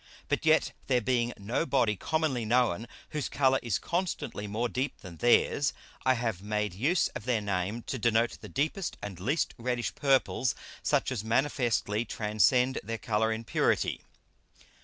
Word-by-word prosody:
But - - 0
yet - - +4 0.2
there 125 -2 +3
being 120 0 +1
no 105 +9 -1
Body 125 -9 +2
commonly 155 - 0
known 115 -2 +1 0.2
whose 150 -3 -3
Colour 135 -1 +3
is 115 -5 0
constantly 175 - -3
more 110 +4 -1
deep 130 +4 -2
than 90 -3 -10
theirs, 135 - +3 0.3
I 130 0 +4
have 115 -6 -2
made 105 -1 -1
use 155 - +2
of 115 - -8
their 125 -3 +2
Name 100 +2 -2
to 130 - -4
denote 115 +1 +2
the - - -9
deepest 155 +6 -2
and 95 -4 -6
least 140 - 0
reddish 120 0 -1
Purples, 135 -2 +2 0.3
such - - +1
as 115 -6 -2
manifestly 115 -3 +1
transcend 120 +4 +2
their 115 +3 -3
Colour 110 0 0
in 110 +1 -3
purity. - - +1
120 Hz, 160 wpm, -29 LUFS, 105-130 Hz, 0.3 s, yet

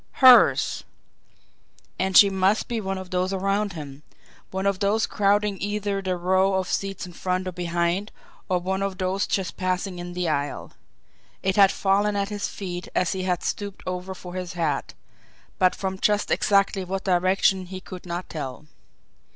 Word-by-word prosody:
Hers! 255 -2 +6 1.2
And 190 0 +3
she 200 -1 +8
must 190 +2 +2
be 235 -2 -2
one 195 -1 -3
of 185 -1 -8
those 185 +1 0
around 195 +1 0
him 145 -3 -8 0.5
one 190 +1 -3
of 200 -1 +1
those 210 +2 +2
crowding 205 0 +1
either 205 -1 -2
the 185 -1 -2
row 190 +2 +2
of 190 -1 0
seats 195 0 -2
in 180 - -11
front 185 +1 -2
or - - -2
behind, 175 +3 -1 0.4
or 185 - +2
one 190 +2 -2
of 195 -1 -2
those 185 0 -1
just 190 -2 -2
passing 185 0 -2
in 175 0 -6
the 180 -1 -2
aisle. 145 -2 -2 0.7
It 190 0 +1
had 195 -2 +6
fallen 205 +1 +1
at 200 0 -1
his 205 -1 -3
feet 180 -3 -6
as 180 - +2
he 190 -2 -3
had 180 -1 -1
stooped 200 -2 -4
over 185 +1 -4
for 180 -1 -10
his 180 -1 -5
hat 160 -5 -2 0.6
but 185 -1 +4
from 190 -1 -4
just 210 0 +1
exactly 195 -1 +2
what 190 +1 -4
direction 185 0 +2
he 185 0 -7
could 185 -1 -10
not 175 +1 -4
tell. 145 -2 -6
190 Hz, 175 wpm, -24 LUFS, 180-195 Hz, 1.2 s, she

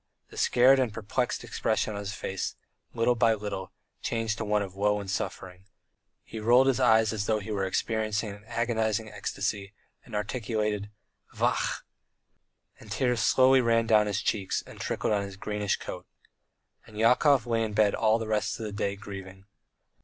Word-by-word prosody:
The - - -13
scared 130 +2 +5
and 125 -4 +1
perplexed 115 +4 -2
expression 110 - -1
on 100 - -4
his 100 -1 -4
face, 95 -2 -4 0.4
little 115 +2 +3
by 115 -1 +3
little, 100 -3 -5 0.3
changed 115 -1 -2
to - - -1
a - - -5
look 105 0 +1
of 95 -1 -8
woe 105 +1 +1
and 100 - -7
suffering; 95 -1 -5 0.6
he 110 - -8
rolled 120 +4 +5
his 135 -1 +2
eyes 110 -3 +4
as 105 -1 -2
though 110 - +2
he 105 +2 -7
were 100 -2 -1
experiencing 110 +2 -1
an 105 +1 -11
agonizing 110 -2 -1
ecstasy, 100 0 -3 0.3
and 115 - -9
articulated, 105 -1 -2 0.5
"Vachhh!" - - 0 1.0
and 105 - -13
tears 125 +1 +1
slowly 130 +4 +5
ran 115 -1 +2
down 110 -2 +4
his 105 0 -1
cheeks 100 -4 -1
and - - -13
trickled - - -1
on 100 - +1
his 100 -1 -7
greenish 105 0 -1
coat. - - -8 0.8
And 105 - -13
Yakov 125 +3 +4
lay 115 -1 +1
in 110 -1 -3
bed 105 -1 +3
all 110 0 +3
the 115 - -4
rest 110 +2 -1
of 110 - -4
the 105 - -4
day 100 -1 -2
grieving. 95 -1 -9
110 Hz, 175 wpm, -28 LUFS, 100-115 Hz, 1.0 s, scared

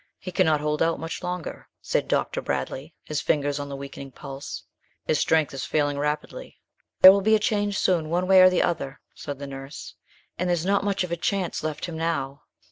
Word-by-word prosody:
"He 185 - -7
cannot 160 -5 +2
hold 150 0 -1
out 165 0 +2
much 165 +1 -5
longer," 180 -1 -5
said - - -1
Dr. - - 0
Bradley, 150 +4 -4
his 150 -1 -3
fingers 145 -1 0
on 145 0 -5
the 140 - -5
weakening 140 0 -8
pulse, 135 +1 -8 0.4
"his 155 - +1
strength 160 -3 +2
is 135 -2 -4
failing 145 -2 0
rapidly." 150 - -4 0.4
"There 185 - +12
will 200 +1 +2
be 220 +2 +4
a - - +2
change 205 -3 0
soon, 165 -4 +1
one 175 +2 +1
way 190 0 +7
or 185 - +9
the 185 - +2
other," 140 -5 -2
said 145 -2 -6
the 140 - -7
nurse, 135 +1 -8 0.5
"and 180 0 0
there's 175 -1 0
not 200 +1 +2
much 200 -2 0
of 180 - -5
a 170 - -1
chance 190 +1 -1
left 155 -1 -3
him 170 -3 -6
now." 140 -4 -2
160 Hz, 210 wpm, -25 LUFS, 145-185 Hz, 0.5 s, There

